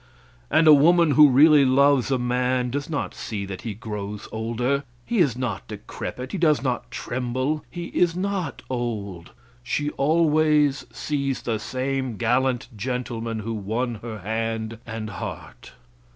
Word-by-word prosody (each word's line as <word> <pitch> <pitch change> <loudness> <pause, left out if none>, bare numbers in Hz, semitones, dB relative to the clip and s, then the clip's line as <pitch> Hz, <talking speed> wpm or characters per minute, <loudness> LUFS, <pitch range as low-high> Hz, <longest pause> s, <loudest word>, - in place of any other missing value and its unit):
And 160 - +4
a 155 - +10
woman 165 +2 +5
who 150 0 +7
really 145 +2 +7
loves 135 -1 +4
a 135 - +2
man, 125 0 0
does 145 +4 -3
not 145 -3 -3
see 100 -3 -5
that 95 -1 -7
he 110 -4 -5
grows 105 -2 -6
older; 120 +5 -1 0.2
he 235 - 0
is 140 -9 +3
not 125 -6 -3
decrepit; 125 +1 -7
he - - -3
does 155 -4 +3
not 125 -3 -2
tremble; 130 +4 -2
he 175 0 -6
is 170 -1 +1
not 185 -4 -3
old; 105 -8 -4 0.3
she 145 +4 -2
always 150 -1 +2
sees 140 -3 -2
the 115 -3 -1
same 130 -1 -3
gallant 125 +2 +1
gentleman 115 -1 -3
who 115 +2 -4
won 110 +3 -2
her 115 -2 -6
hand 110 +2 -3
and 110 -1 -5
heart. - - -8
125 Hz, 150 wpm, -24 LUFS, 115-145 Hz, 0.3 s, a